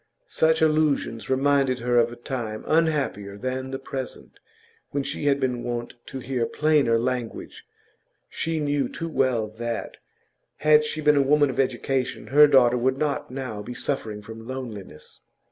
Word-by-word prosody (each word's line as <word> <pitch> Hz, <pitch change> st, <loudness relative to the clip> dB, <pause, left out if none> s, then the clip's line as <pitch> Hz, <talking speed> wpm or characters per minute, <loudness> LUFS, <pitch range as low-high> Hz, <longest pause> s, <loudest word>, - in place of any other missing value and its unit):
Such 160 Hz, 0 st, +2 dB
allusions 155 Hz, -7 st, +1 dB
reminded 135 Hz, -1 st, +2 dB
her 120 Hz, 0 st, +3 dB
of 120 Hz, 0 st, +2 dB
a -, -, -8 dB
time 120 Hz, -3 st, -5 dB
unhappier 145 Hz, -11 st, 0 dB
than 130 Hz, +3 st, -3 dB
the 135 Hz, -, -3 dB
present, 135 Hz, -1 st, -7 dB, 0.5 s
when 140 Hz, 0 st, -2 dB
she 140 Hz, +1 st, -4 dB
had 140 Hz, -1 st, +3 dB
been 125 Hz, -3 st, -1 dB
wont 120 Hz, 0 st, -4 dB
to -, -, -6 dB
hear 125 Hz, -2 st, -2 dB
plainer 150 Hz, -6 st, +2 dB
language. 125 Hz, 0 st, -4 dB, 0.6 s
She 165 Hz, -1 st, -2 dB
knew 145 Hz, -3 st, 0 dB
too 165 Hz, -, -5 dB
well 130 Hz, -7 st, +1 dB
that, 115 Hz, +2 st, -5 dB, 0.6 s
had 150 Hz, 0 st, +5 dB
she 155 Hz, +1 st, -4 dB
been 150 Hz, -1 st, +4 dB
a -, -, +5 dB
woman 145 Hz, 0 st, +3 dB
of -, -, -6 dB
education, 130 Hz, 0 st, -1 dB
her 150 Hz, +1 st, +9 dB
daughter 125 Hz, -3 st, +5 dB
would 130 Hz, +2 st, +1 dB
not 150 Hz, -1 st, -1 dB
now 125 Hz, -5 st, -5 dB
be 120 Hz, +4 st, -7 dB
suffering 110 Hz, -7 st, -3 dB
from 115 Hz, +1 st, -10 dB
loneliness. 115 Hz, -11 st, -8 dB
130 Hz, 160 wpm, -25 LUFS, 120-145 Hz, 0.6 s, her